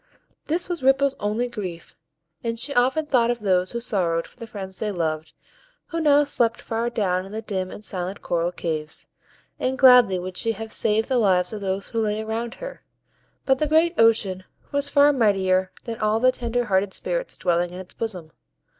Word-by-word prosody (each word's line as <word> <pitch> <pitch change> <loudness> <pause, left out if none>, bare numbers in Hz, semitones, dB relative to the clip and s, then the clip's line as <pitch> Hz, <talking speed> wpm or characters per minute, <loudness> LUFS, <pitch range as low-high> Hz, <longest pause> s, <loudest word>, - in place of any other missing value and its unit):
This 340 +3 0
was 350 -4 -3
Ripple's 270 +1 +3
only 215 +4 -1
grief, 190 -8 -7 0.5
and 230 -1 -2
she 280 +5 -3
often 265 +5 +2
thought 245 -5 +2
of 240 0 0
those 185 -2 +1
who 235 - -3
sorrowed 180 -8 -1
for - - -16
the 230 - -7
friends 190 -3 -7
they 215 -1 -1
loved, 160 -3 -3 0.6
who 330 0 -2
now 295 -1 +5
slept 235 -5 0
far 230 +1 -2
down 185 -6 0
in 195 - -11
the 220 +1 -5
dim 190 -3 -3
and 210 - -8
silent 185 +1 -4
coral 170 0 0
caves, 160 -3 -4 0.5
and 260 +1 -1
gladly 250 -7 +7
would 180 0 -6
she 225 -1 0
have 220 +1 -6
saved 220 +1 +2
the 255 -2 +2
lives 185 -3 +2
of 210 - -5
those 195 0 -3
who 230 - -2
lay 210 -1 0
around 225 +2 -4
her; - - -8 0.6
but 265 -1 +3
the 305 - +1
great 320 +3 +3
ocean 215 - +3 0.3
was 285 0 +2
far 285 +1 +5
mightier 190 -6 +2
than 230 -2 -6
all 215 +1 +1
the 255 +2 +5
tender 245 -1 -2
hearted 190 -1 +1
Spirits - - -3
dwelling 175 -1 +1
in 180 +1 -9
its 185 -1 -9
bosom. 180 -8 -5
220 Hz, 195 wpm, -24 LUFS, 185-250 Hz, 0.6 s, gladly